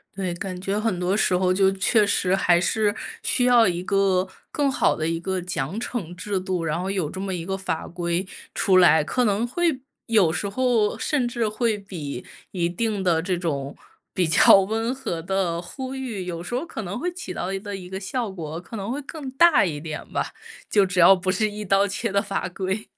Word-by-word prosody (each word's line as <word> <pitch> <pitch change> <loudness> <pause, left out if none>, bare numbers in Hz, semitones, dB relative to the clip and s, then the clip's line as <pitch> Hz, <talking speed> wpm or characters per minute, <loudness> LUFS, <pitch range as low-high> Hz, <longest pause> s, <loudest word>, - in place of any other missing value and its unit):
对， 190 -2 -2
感 185 0 -5
觉 195 +2 -1
很 215 -5 -1
多 185 +3 +1
时 185 -4 +2
候 185 0 +2
就 190 +1 +4
确 205 +3 +3
实 190 -2 +1
还 175 -2 +3
是 210 +1 +1 0.3
需 255 - +1
要 245 -3 +6
一 175 -1 -1
个， 195 -1 +2 0.2
更 285 -2 +1
好 - - +2
的 155 - -2
一 165 0 -1
个 185 +2 -2
奖 175 +1 -3
惩 220 -8 -4
制 190 +2 -3
度， 185 -2 -2
然 165 0 -1
后 185 +2 -2
有 185 -7 -1
这 185 - -7
么 195 0 -3
一 175 -2 -3
个 190 +2 -3
法 190 -4 -3
规 170 +1 -2 0.3
出 190 -1 +3
来， 160 -4 +6
可 250 +11 0
能 210 +2 +1
会 330 0 0 0.2
有 210 -8 +4
时 180 +5 -2
候 235 -1 +1
甚 270 -5 0
至 235 -2 -1
会 220 -1 0
比 155 -10 -6 0.3
一 170 -3 0
定 210 +3 -1
的 170 -2 +2
这 185 0 0
种 145 -5 -3 0.4
比 180 -2 +1
较 160 +5 +7
温 225 +5 -1
和 265 -11 -4
的 175 -1 -1
呼 260 +9 -6
吁， 240 -8 -4
有 170 -1 -5
时 180 - -7
候 255 +4 0
可 225 -9 -6
能 200 +5 -4
会 355 +2 -2
起 350 - -7
到 180 - -3
的 195 - -2
一 195 - -3
个 205 0 -6
一 180 -2 -8
个 190 +1 -5
效 225 +3 -3
果， 165 -3 -6
可 225 +5 -8
能 200 +3 -4
会 285 +3 -3
更 280 -1 -7
大 310 -2 +5
一 155 -5 -3
点 155 -1 -6
吧， - - 0 0.4
就 200 -2 +4
只 180 -1 -2
要 185 +3 +8
不 185 0 -1
是 215 +3 +1
一 210 0 -6
刀 195 +1 +3
切 205 +2 -3
的 200 0 +2
法 200 -2 -3
规。 190 +3 -3
195 Hz, 240 characters per minute, -24 LUFS, 180-220 Hz, 0.4 s, 要